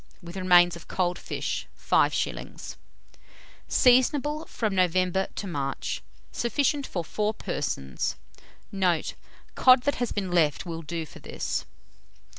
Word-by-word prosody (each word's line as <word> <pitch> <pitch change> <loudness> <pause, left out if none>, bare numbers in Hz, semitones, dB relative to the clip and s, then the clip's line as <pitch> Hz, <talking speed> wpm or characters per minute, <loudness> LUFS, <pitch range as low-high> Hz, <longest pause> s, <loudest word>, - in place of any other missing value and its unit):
with 175 0 -10
remains 175 -2 +5
of 170 - -12
cold 180 -1 -1
fish, - - -3
5d. - - 0 0.9
Seasonable 290 +5 +3
from 215 -3 -2
November 185 +1 +2
to - - -4
March. 140 -7 -3 0.3
Sufficient 280 +3 0
for 175 - -3
4 210 +5 -1
persons. 145 - -3 0.6
Note. 180 -5 +1 0.4
Cod 255 -1 +6
that 285 - 0
has 245 - 0
been 195 -3 -2
left 160 -3 +2
will 165 -1 -5
do 165 +1 -4
for - - -13
this. - - -3
185 Hz, 120 wpm, -27 LUFS, 170-235 Hz, 0.9 s, Cod